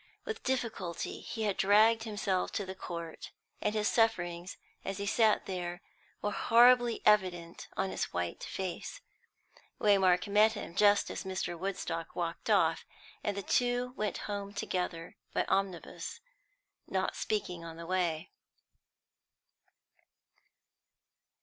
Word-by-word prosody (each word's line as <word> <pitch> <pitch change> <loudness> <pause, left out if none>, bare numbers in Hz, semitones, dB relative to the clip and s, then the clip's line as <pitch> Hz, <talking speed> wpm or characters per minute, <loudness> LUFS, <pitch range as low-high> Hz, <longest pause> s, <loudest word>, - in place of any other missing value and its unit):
With 445 - -4
difficulty 225 -10 -2
he 225 - -5
had 205 -3 0
dragged 220 +3 +5
himself 200 -4 -1
to 205 - -1
the 190 - -5
court, 170 -3 -7 0.3
and 210 +1 0
his 210 0 +1
sufferings 175 -6 +1 0.3
as 195 0 -3
he 200 - -3
sat 220 +1 +3
there 175 -1 -4 0.4
were 205 - 0
horribly 240 +2 +5
evident 180 -5 +2
on 190 - 0
his - - -1
white 90 -1 -4
face. 190 - -5 0.8
Waymark 190 -3 +4
met 210 +2 +5
him 205 -5 -6
just 205 +2 +4
as - - -4
Mr. 185 -2 -3
Woodstock 170 -2 -4
walked 170 -1 -3
off; - - +3 0.4
and 205 -1 -1
the 200 - -3
two 245 +3 +1
went 210 -4 -1
home 200 -1 -4
together 180 -4 -3 0.2
by - - +3
omnibus, 195 - -2 0.7
not 190 0 -1
speaking 190 -5 -2
on 165 -1 -8
the 170 - -7
way. 175 -2 -1
195 Hz, 125 wpm, -32 LUFS, 175-215 Hz, 0.8 s, dragged